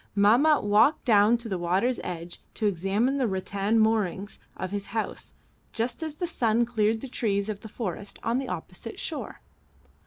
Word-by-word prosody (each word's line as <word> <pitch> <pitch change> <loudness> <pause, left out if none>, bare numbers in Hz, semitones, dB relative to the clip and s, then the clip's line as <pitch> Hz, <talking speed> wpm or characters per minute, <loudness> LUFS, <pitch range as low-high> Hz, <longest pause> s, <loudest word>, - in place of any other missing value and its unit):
Mahmat 240 +10 +5
walked 215 +9 +4
down 220 0 +5
to 235 0 -8
the 190 -4 -2
water's 190 +9 +1
edge 175 -1 -6
to 220 - -2
examine 205 +8 +1
the 260 -3 +1
rattan 200 +2 0
moorings 210 -3 0 0.2
of 185 0 -4
his 200 0 -4
house 225 -1 -4 0.4
just 235 +4 -2
as 315 -2 -4
the 350 - -2
sun 235 -8 +1
cleared 220 -1 +1
the 270 - -5
trees 210 -5 -1
of 210 -2 -3
the 220 - -10
forest 205 -2 -5
on 235 +3 +1
the 270 - -4
opposite 180 +4 -7
shore. 310 - -5
215 Hz, 175 wpm, -27 LUFS, 200-240 Hz, 0.4 s, Mahmat